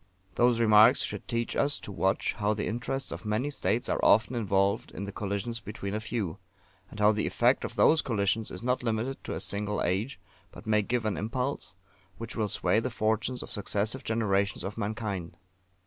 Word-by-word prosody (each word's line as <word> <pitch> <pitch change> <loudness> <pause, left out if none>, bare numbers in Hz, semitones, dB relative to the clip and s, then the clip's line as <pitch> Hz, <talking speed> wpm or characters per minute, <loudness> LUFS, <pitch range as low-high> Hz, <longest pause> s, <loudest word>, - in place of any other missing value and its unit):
Those 120 +3 +3
remarks 110 +2 +6
should - - -4
teach 115 -1 -2
us 145 +1 +1
to - - -8
watch 95 0 0
how 105 -1 0
the 105 - -2
interests 120 +4 -3
of - - -6
many 110 +7 -1
states 120 -4 0
are - - -1
often 110 +4 +5
involved 100 -3 +1
in 100 - -7
the 100 - -5
collisions 105 +4 -3
between 100 -3 -6
a 105 - -1
few; 110 -5 -3 0.5
and 110 - -10
how 105 0 +6
the 105 0 -1
effect - - +2
of - - -4
those 160 0 +5
collisions 110 -2 0
is 90 - -6
not 125 +1 +1
limited 120 +3 -2
to - - -3
a - - -3
single 105 0 -2
age, 100 +10 -1 0.3
but - - -12
may 105 -1 +3
give 115 +2 -1
an 105 - 0
impulse 125 0 -3 0.4
which 115 0 -7
will 110 -2 0
sway 90 +3 +1
the 115 - -2
fortunes 110 +2 -1
of - - -9
successive 105 +4 -1
generations 100 -3 0
of 95 - -4
mankind. 105 -5 -4
110 Hz, 195 wpm, -29 LUFS, 100-120 Hz, 0.5 s, remarks